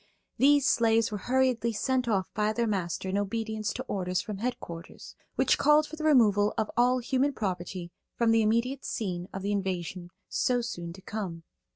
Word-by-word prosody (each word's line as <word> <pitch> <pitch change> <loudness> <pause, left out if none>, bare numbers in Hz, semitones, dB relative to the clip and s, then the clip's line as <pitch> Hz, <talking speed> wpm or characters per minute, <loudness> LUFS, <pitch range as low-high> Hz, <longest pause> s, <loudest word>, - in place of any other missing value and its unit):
These 285 +1 +5
slaves 225 -4 +3
were 210 - -3
hurriedly 250 -3 +2
sent 255 +3 0
off 195 -4 0
by 210 +1 +1
their 235 +1 0
master 190 -4 -2
in 195 +2 0
obedience 215 +1 -2
to - - -4
orders 180 -2 -2
from 200 0 -5
headquarters, 175 -8 -6 0.2
which - - +3
called 300 +1 +5
for 315 - -8
the 315 - -7
removal 210 -9 +4
of 220 - -1
all 245 +2 +4
human 260 +3 0
property 180 -4 -4 0.2
from 230 -1 +2
the 225 0 +4
immediate 235 +5 +1
scene 180 -4 -3
of 195 - -6
the 200 - -1
invasion 185 -3 -3 0.2
so 250 -1 +1
soon 175 -8 -5
to 190 +1 -14
come. 185 -7 -5
215 Hz, 180 wpm, -28 LUFS, 190-245 Hz, 0.2 s, These